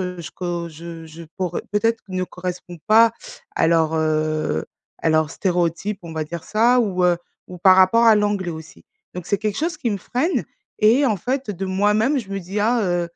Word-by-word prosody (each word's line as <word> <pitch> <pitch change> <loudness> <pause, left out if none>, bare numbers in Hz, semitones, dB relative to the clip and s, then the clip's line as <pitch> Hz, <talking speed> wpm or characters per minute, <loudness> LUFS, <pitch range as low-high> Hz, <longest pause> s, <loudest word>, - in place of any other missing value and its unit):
heu, 180 -1 -4
je 170 - -7
co, 175 -2 -4
je 165 +1 -9
je 165 +1 -11
cor 180 -2 -2
peut-être 225 +2 +1
ne 185 -1 -2
correspond 180 -1 -7
pas 225 +1 +6 0.4
à - - +2
leur, 160 -1 +2
heu, 155 - 0 0.3
à 160 - 0
leurs 155 -1 +2
stéréotypes, 180 +3 -1
on 165 -1 -8
va 155 -1 -2
dire 170 +1 -7
ça, 240 +3 +3
ou 185 -5 0
heu 175 -1 +3 0.3
ou 180 -1 -9
par 185 +1 +6
rapport 190 +5 +5
à 220 -1 +7
l'anglais 205 -3 0
aussi. 160 0 -10 0.3
Donc 180 -1 -6
c'est 200 - 0
quelque 210 -1 -2
chose 330 +2 -1
qui 245 - -2
me 200 - -2
freine, 270 - -1 0.4
et 240 +7 +5
en 215 -4 +1
fait 255 +5 -3
de 195 -1 -4
moi-même 210 +8 +2
je 220 -7 -7
me 195 0 -3
dis: 190 +4 -5
«Ah, 230 +2 +2
heu, 175 -2 0
185 Hz, 205 wpm, -21 LUFS, 170-215 Hz, 0.4 s, à